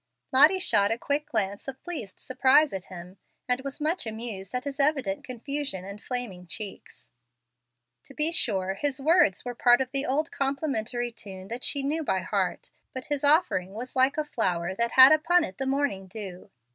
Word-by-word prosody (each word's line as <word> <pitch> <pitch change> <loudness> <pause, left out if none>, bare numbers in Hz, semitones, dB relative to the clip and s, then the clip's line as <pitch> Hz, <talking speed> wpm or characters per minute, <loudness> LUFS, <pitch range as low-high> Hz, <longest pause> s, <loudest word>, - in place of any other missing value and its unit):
Lottie 295 +8 +6
shot 205 - +3
a 225 - -1
quick 290 +4 -1
glance 205 -4 -2
of 265 -1 -7
pleased 300 - -7
surprise 270 +3 +3
at 190 -1 -5
him, 180 +1 -11 0.3
and 250 +1 +1
was 275 +2 -5
much 310 -2 0
amused 220 -2 -6
at 250 - -2
his 280 -1 -6
evident 275 -9 +1
confusion 255 -5 -4
and 200 +1 -9
flaming 225 -9 -5
cheeks. 190 +5 -7 0.9
To 275 - -9
be 310 +2 +1
sure 190 - 0
his 280 +6 -3
words 295 - +3
were 245 - -4
part 245 +1 +4
of 260 -1 -2
the 275 +1 -1
old 305 +5 -1
complimentary 260 -4 -2
tune 195 -4 -8
that 240 +2 -5
she 280 -2 +2
knew 310 +4 -1
by - - 0
heart, - - -2 0.2
but 260 - -4
his 285 - -3
offering 285 - +3
was 245 +3 -7
like 260 +3 +3
a 305 - -1
flower 185 -10 -1
that 235 +4 -1
had 260 0 +9
upon 330 +3 +4
it 185 - -7
the 270 - -2
morning 270 -9 -1
dew. 190 -2 -9
255 Hz, 185 wpm, -27 LUFS, 200-285 Hz, 0.9 s, had